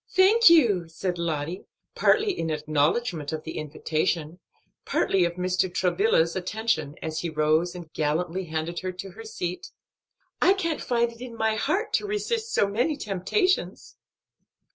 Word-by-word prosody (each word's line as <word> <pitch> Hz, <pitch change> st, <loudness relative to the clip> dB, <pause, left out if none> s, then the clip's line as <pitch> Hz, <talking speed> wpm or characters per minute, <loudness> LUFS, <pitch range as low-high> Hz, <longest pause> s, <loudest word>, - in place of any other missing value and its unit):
"Thank 405 Hz, +3 st, +6 dB
you," 225 Hz, -, +4 dB
said 175 Hz, +2 st, -3 dB
Lottie, 165 Hz, +1 st, -3 dB, 0.3 s
partly 430 Hz, -1 st, +3 dB
in 165 Hz, -, -3 dB
acknowledgment 155 Hz, +3 st, 0 dB
of 155 Hz, -1 st, -4 dB
the 160 Hz, -, -5 dB
invitation, 155 Hz, +2 st, -2 dB, 0.4 s
partly 190 Hz, -2 st, +2 dB
of 170 Hz, -, -2 dB
Mr. 180 Hz, +1 st, 0 dB
Travilla's 175 Hz, -2 st, +2 dB
attention, 185 Hz, -6 st, -1 dB
as 160 Hz, 0 st, -3 dB
he 170 Hz, -, -3 dB
rose 155 Hz, +3 st, +1 dB
and 170 Hz, -3 st, -10 dB
gallantly 170 Hz, +5 st, -1 dB
handed 160 Hz, +1 st, -3 dB
her 185 Hz, 0 st, -3 dB
to 190 Hz, +1 st, -8 dB
her 225 Hz, +5 st, -10 dB
seat, 180 Hz, -5 st, -5 dB, 0.7 s
"I 380 Hz, -, +6 dB
can't 335 Hz, -6 st, -2 dB
find 235 Hz, -1 st, +1 dB
it 230 Hz, +1 st, -15 dB
in 250 Hz, -2 st, -7 dB
my 220 Hz, -1 st, +1 dB
heart 315 Hz, -, -1 dB
to 415 Hz, -, +1 dB
resist 440 Hz, +2 st, -2 dB
so -, -, +3 dB
many 245 Hz, +10 st, 0 dB
temptations." 215 Hz, -, -1 dB
180 Hz, 150 wpm, -26 LUFS, 160-235 Hz, 0.7 s, Thank